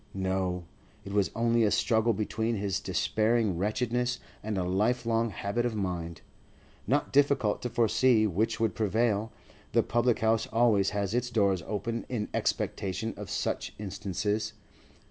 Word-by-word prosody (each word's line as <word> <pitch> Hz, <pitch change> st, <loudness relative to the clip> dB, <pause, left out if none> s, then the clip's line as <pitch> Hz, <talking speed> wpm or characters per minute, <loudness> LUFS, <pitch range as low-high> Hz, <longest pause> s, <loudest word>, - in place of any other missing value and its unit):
No; 95 Hz, -2 st, -1 dB, 0.4 s
it 100 Hz, -, -6 dB
was 100 Hz, -2 st, +2 dB
only 115 Hz, 0 st, +2 dB
a 105 Hz, -, +4 dB
struggle 115 Hz, +2 st, +2 dB
between 110 Hz, +2 st, -1 dB
his 100 Hz, -3 st, -1 dB
despairing 110 Hz, -3 st, +1 dB
wretchedness 120 Hz, +4 st, 0 dB, 0.2 s
and 105 Hz, -1 st, -3 dB
a 90 Hz, -, 0 dB
lifelong 115 Hz, +5 st, +1 dB
habit 105 Hz, +3 st, -2 dB
of 120 Hz, -2 st, -1 dB
mind. 85 Hz, -5 st, -3 dB, 0.7 s
Not 140 Hz, +6 st, +1 dB
difficult 135 Hz, -6 st, +3 dB
to 125 Hz, -, -2 dB
foresee 115 Hz, 0 st, +3 dB
which 110 Hz, +4 st, 0 dB
would 110 Hz, -2 st, +1 dB
prevail; 110 Hz, 0 st, +1 dB, 0.4 s
the -, -, +4 dB
public 120 Hz, 0 st, +2 dB
house 110 Hz, 0 st, +1 dB
always 110 Hz, -4 st, +3 dB
has 100 Hz, 0 st, -2 dB
its 125 Hz, 0 st, 0 dB
doors 100 Hz, -6 st, +2 dB
open 115 Hz, +3 st, -3 dB
in 110 Hz, -4 st, -2 dB
expectation 105 Hz, +4 st, -1 dB
of -, -, -8 dB
such -, -, -2 dB
instances. 100 Hz, +1 st, -2 dB
110 Hz, 145 wpm, -29 LUFS, 100-115 Hz, 0.7 s, a